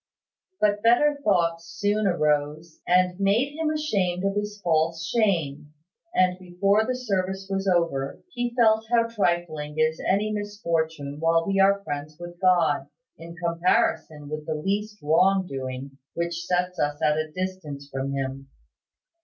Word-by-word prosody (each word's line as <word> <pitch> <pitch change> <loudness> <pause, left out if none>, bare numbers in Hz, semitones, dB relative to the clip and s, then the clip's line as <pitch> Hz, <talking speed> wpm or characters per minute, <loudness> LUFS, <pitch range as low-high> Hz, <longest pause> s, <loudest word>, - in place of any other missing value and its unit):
But 205 -1 +2
better 285 +6 +4
thoughts 170 -5 +1
soon 205 +4 0
arose, 155 -1 0
and 180 0 +3
made 220 +9 +2
him 315 0 -1
ashamed 200 - 0
of 195 - +1
his 205 0 -3
false 165 0 +1
shame; 165 -9 0 0.4
and 185 0 +3
before 195 +4 +1
the 255 - 0
service 190 -5 -2
was 195 0 -1
over, 170 -7 0
he 245 -1 -2
felt 220 -2 +3
how 235 -1 +4
trifling 170 -8 -1
is 155 0 +1
any 210 +3 +2
misfortune 165 -8 -2
while 165 +1 +2
we 195 0 0
are 200 +1 +4
friends 145 -1 -5
with 175 0 -10
God, 180 -2 +3 0.3
in 170 +1 -10
comparison 170 -3 0
with 155 +1 -6
the 155 - -1
least 205 +6 -2
wrong 185 +5 +3
doing 135 -1 -6 0.2
which 170 0 -3
sets 180 0 -1
us 145 0 0
at 150 - +3
a 155 0 -3
distance 170 -6 -5
from 135 0 -4
him. 135 0 -4
175 Hz, 145 wpm, -25 LUFS, 155-200 Hz, 0.4 s, better